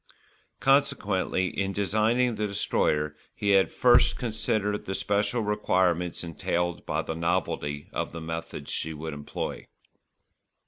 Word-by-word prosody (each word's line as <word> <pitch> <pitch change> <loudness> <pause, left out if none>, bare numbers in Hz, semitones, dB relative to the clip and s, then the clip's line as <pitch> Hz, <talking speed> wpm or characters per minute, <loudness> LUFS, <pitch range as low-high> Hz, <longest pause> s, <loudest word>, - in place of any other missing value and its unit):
Consequently 105 -9 +2
in 95 0 -2
designing 110 +5 +2
the 105 -1 -1
Destroyer 75 -6 0 0.2
he 100 -1 0
had 95 -1 +5
first 120 -1 +5
considered 110 -3 -1
the 95 - -3
special 105 +4 0
requirements 90 -5 +1
entailed 85 +1 -2
by - - 0
the - - -3
novelty 80 -4 -1
of - - -2
the 85 - -6
methods 80 -3 -5
she 80 0 -1
would 80 +1 -5
employ. 75 0 -5
95 Hz, 125 wpm, -27 LUFS, 80-105 Hz, 0.2 s, had